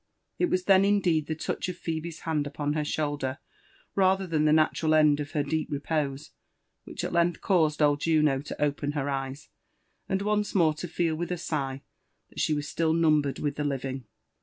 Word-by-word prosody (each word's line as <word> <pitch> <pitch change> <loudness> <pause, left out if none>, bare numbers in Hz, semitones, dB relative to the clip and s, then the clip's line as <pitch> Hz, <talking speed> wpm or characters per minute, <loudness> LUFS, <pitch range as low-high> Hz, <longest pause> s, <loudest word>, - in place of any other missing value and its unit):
It 355 - +2
was 185 - +1
then 190 0 +5
indeed 180 -7 +2
the 160 - -2
touch 160 - -3
of 180 - -5
Phebe's 165 -1 -5
hand 150 -3 -1
upon 145 0 -2
her 155 - 0
shoulder^ 145 -3 -2 0.6
rather 190 0 +3
than 160 -3 0
the 150 - +4
natural 155 0 +3
end 150 -1 +5
of 145 +1 -5
her 150 -3 +1
deep 155 +2 -1
repose, 145 -1 -2 0.6
whidi - - -6
at - - -3
length 170 0 +2
caused 155 -6 +2
old 145 -1 +3
Juno 150 -4 +2
to 145 - -8
open 145 0 0
her 145 -1 -1
eyes, 135 +2 -4 0.6
and 195 0 0
once 210 0 0
more 165 -5 +4
to 155 +4 -6
feel 165 -1 0
with 175 +2 -4
a 180 - -1
sigh 135 -5 -3 0.5
that - - -10
she 155 - +2
was 145 0 -3
still 160 -1 0
numbered 155 -4 +2
with 145 -1 -2
the 150 - -1
living. 135 -2 -3
155 Hz, 195 wpm, -27 LUFS, 145-170 Hz, 0.6 s, then